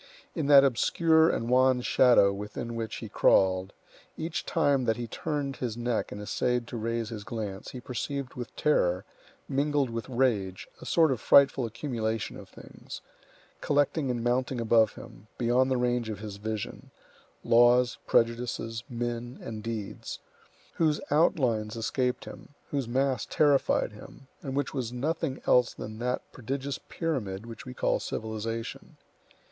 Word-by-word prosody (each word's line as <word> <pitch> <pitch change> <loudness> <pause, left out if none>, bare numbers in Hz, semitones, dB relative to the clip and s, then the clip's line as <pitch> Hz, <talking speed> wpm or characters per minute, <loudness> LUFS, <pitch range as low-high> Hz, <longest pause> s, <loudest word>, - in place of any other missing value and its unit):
In 155 -4 -2
that 140 -1 +8
obscure 160 +5 +4
and 115 - -1
wan 130 0 +4
shadow 120 -6 +5
within 105 +4 -5
which 115 -2 -4
he - - -6
crawled, 95 0 +3 0.5
each 160 +1 -4
time 140 -6 +2
that 110 0 +1
he 120 - -3
turned 145 -1 -3
his 120 -3 -3
neck 120 -1 -1
and 105 - -6
essayed 120 +3 -1
to - - -6
raise 115 0 -2
his 110 -3 -6
glance, 105 -3 -5
he 130 - -7
perceived 130 +2 -4
with 120 -1 -7
terror, 90 -11 +1 0.4
mingled 140 -1 +1
with 115 +2 -5
rage, 115 -8 0
a - - -9
sort 160 -3 +4
of 125 -3 -2
frightful 135 -3 +5
accumulation 115 -3 -3
of - - -11
things, - - -11 0.6
collecting 145 0 +1
and 120 -2 -2
mounting 125 +1 0
above 115 -1 +3
him, 105 - -13
beyond 125 +2 +2
the 130 - +1
range 120 -2 0
of 105 - -4
his 105 -1 -7
vision,—laws, 120 +3 0
prejudices, 115 -1 0
men, 120 +1 -4
and 110 -2 -6
deeds,—whose 115 +7 -4
outlines 125 - +2
escaped 125 +2 -1
him, 145 - -12 0.2
whose 140 -4 -1
mass 130 +2 0
terrified 145 -5 +2
him, 105 +5 -13 0.2
and 135 -2 -5
which 140 -2 -1
was 125 -4 -3
nothing 140 +2 -2
else 125 -1 +4
than 110 +1 -7
that 125 +1 -1
prodigious 135 +2 -4
pyramid 115 - -3
which 115 +2 -10
we 125 - -6
call - - +1
civilization. 110 +1 -5
120 Hz, 145 wpm, -28 LUFS, 110-135 Hz, 0.6 s, that